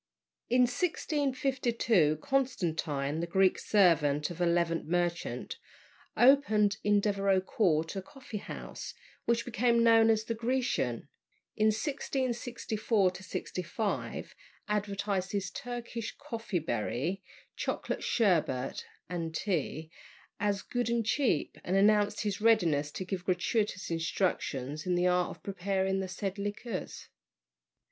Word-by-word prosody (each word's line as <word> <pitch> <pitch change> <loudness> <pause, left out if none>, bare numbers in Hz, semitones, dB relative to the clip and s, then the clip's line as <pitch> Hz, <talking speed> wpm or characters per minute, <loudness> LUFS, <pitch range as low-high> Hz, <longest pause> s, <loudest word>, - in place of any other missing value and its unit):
In 250 +1 +4
1652 255 - +1
Constantine, 160 - 0
the 170 - -2
Greek 190 +1 +3
servant 150 -7 +3
of 175 +1 -7
a 175 - +3
Levant 170 -1 +1
merchant, 175 0 -1 0.6
opened 220 -6 +5
in 205 0 +4
Devereux 195 -2 +2
Court 165 -5 +1
a 195 - -2
coffee 225 +1 -8
house, - - -7 0.3
which 235 0 +1
became 235 0 +2
known 225 -1 +6
as 220 -1 +3
"The 230 - -2
Grecian." 230 - -1 0.5
In 215 - +3
1664 235 - 0 0.5
5 205 +4 -3 0.3
advertised 200 -2 -1
his 195 -2 -2
Turkey 240 0 -5
"coffee 230 -9 -4
bery," 155 - -2 0.3
chocolate, - - -3
"sherbet," 170 - +1 0.2
and 165 -2 -4
tea, 160 -3 -2 0.5
as 205 -1 0
good 245 -1 -2
and 235 -1 +1
cheap, 225 - 0
and 185 - -1
announced 205 +1 +4
his 205 0 -2
readiness 170 -11 +3
to 185 - -4
give 185 -1 -4
gratuitous 190 +1 0
instructions 160 -3 -1
in 180 - +2
the 175 +1 +2
art 180 -1 +2
of - - -34
preparing 190 0 -1
the 190 - -2
said 195 +2 -4
liquors. 205 +4 -5
200 Hz, 120 wpm, -31 LUFS, 175-230 Hz, 0.6 s, known